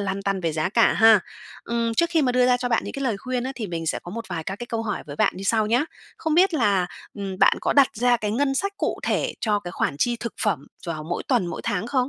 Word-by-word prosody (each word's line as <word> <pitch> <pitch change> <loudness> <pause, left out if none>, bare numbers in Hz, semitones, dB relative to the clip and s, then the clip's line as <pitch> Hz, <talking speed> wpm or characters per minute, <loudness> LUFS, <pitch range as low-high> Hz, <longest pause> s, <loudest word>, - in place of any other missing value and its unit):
lăn 195 0 -2
tăn 195 -1 -1
về 165 -3 -1
giá 155 +2 0
cả 225 +3 +4
ha. 220 -2 +6 0.4
Ừm, 230 -1 -1
trước 335 +8 +2
khi 325 -2 +2
mà 255 -2 +2
đưa 250 0 +4
ra 250 0 +4
cho 245 0 -2
bạn 230 - +1
những - - -6
cái 275 - -5
lời 230 -5 0
khuyên 250 +2 -3
á 265 - -3
thì 225 -5 -4
mình 165 -3 -4
sẽ - - 0
có 175 - -9
một 230 +4 -5
vài 165 -2 -4
các 195 +4 -4
cái 240 - -7
câu 230 -1 -2
hỏi 210 -4 -3
với 145 - -8
bạn - - +3
như 190 - -6
sau 220 +1 +2
nhá. 245 +7 +2 0.3
Không 320 -1 -1
biết 360 0 +4
là, 200 -9 +2 0.3
ừm, 195 -2 -5
bạn - - +5
có - - +1
đặt 280 -2 +6
ra 245 +2 +3
cái 210 -2 -3
ngân 270 +5 +1
sách 395 +8 -1
cụ - - -1
thể - - 0
cho 210 -2 +1
cái 175 - -7
khoản 140 - -1
chi 240 +5 +1
thực 235 - -5
phẩm 160 -10 0 0.2
vào 155 -2 -4
mỗi 170 +2 -3
tuần, 180 - +2
mỗi 170 - -5
tháng 205 -2 -1
không? 255 0 0
225 Hz, 295 wpm, -24 LUFS, 195-250 Hz, 0.4 s, ha